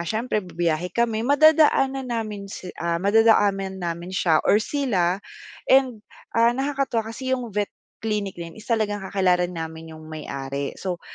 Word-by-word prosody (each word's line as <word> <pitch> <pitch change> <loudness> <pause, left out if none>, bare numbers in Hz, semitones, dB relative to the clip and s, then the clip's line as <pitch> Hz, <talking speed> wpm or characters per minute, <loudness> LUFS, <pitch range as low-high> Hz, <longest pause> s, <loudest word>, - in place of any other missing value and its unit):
siyempre 215 +5 -1
bibiyahe 175 -2 -1
kami, 230 -2 +1
madadaanan 275 -1 +4
namin 215 -4 -4
si 185 -2 -8
ah, 170 0 0
madadaanan 200 -1 +3
namin 170 +1 -4
siya 175 -4 +2
or - - +6
sila 210 -7 0 0.5
and, 260 -4 +4 0.3
ah, 235 +1 +3
nakakatuwa 270 -4 -1
kasi 260 +2 -6
'yong 240 -4 -7
vet 205 0 0 0.4
clinic 210 -3 -2
na 170 -1 -7
'yon - - -18
is - - -15
talagang 215 -3 0
kakilala 185 -2 +1
namin 160 -2 -7
'yong 155 0 -11
may-ari. 140 -3 -5
So, 180 -2 -4
200 Hz, 150 wpm, -24 LUFS, 175-235 Hz, 0.5 s, or